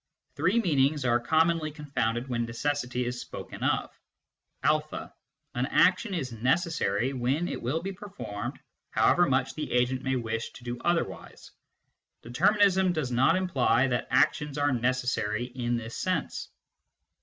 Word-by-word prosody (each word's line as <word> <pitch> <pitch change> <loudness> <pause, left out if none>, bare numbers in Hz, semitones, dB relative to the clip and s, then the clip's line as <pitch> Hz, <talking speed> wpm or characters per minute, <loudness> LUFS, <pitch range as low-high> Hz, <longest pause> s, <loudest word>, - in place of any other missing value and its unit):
Three 190 +7 +2
meanings 145 - +2
are 120 0 +3
commonly 160 +4 +2
confounded 135 -5 -2
when 120 -2 -1
necessity 125 +1 -2
is 120 0 -3
spoken - - -8
of: - - 0 0.7
(a) - - 0 0.4
An 125 +2 -1
action 190 +5 +3
is 135 -7 -3
necessary 125 - 0
when 135 +7 0
it - - -4
will 150 +8 -1
be 195 - -3
performed 190 - -6 0.3
however 175 0 +4
much 130 0 +1
the 150 -1 -5
agent 125 +1 +1
may 130 0 0
wish 115 -2 -2
to 120 - -13
do 120 0 -5
otherwise. 170 -1 -2 0.7
Determinism 190 - +3
does 150 -6 -2
not 130 +7 +4
imply 135 -9 +2
that 120 -1 -1
actions 150 -1 +2
are 145 0 +2
necessary 120 -3 0
in 120 -1 -2
this 115 0 -6
sense. 185 -5 -2
130 Hz, 140 wpm, -28 LUFS, 120-165 Hz, 0.7 s, however